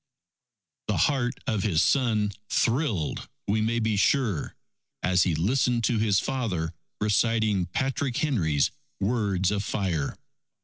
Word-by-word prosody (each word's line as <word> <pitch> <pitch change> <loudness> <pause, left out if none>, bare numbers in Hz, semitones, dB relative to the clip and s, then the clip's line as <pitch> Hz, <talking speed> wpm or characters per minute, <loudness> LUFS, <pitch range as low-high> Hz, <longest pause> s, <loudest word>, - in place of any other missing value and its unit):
The - - 0
heart 130 -4 +1
of 110 -3 0
his 90 -6 +2
son 110 -6 +2 0.2
thrilled, 115 - 0 0.2
we 105 +2 +1
may 115 +2 0
be 110 -2 +1
sure, 105 - +1 0.5
as 90 0 +3
he 85 -4 +1
listened 120 - +1
to 115 -1 +2
his 105 -3 +3
father 100 -13 -2 0.3
reciting 105 -2 +2
Patrick 130 +5 -1
Henry's 85 - +1 0.3
words 100 -3 +1
of 105 -1 -1
fire. 90 -10 -2
110 Hz, 125 wpm, -26 LUFS, 95-120 Hz, 0.5 s, as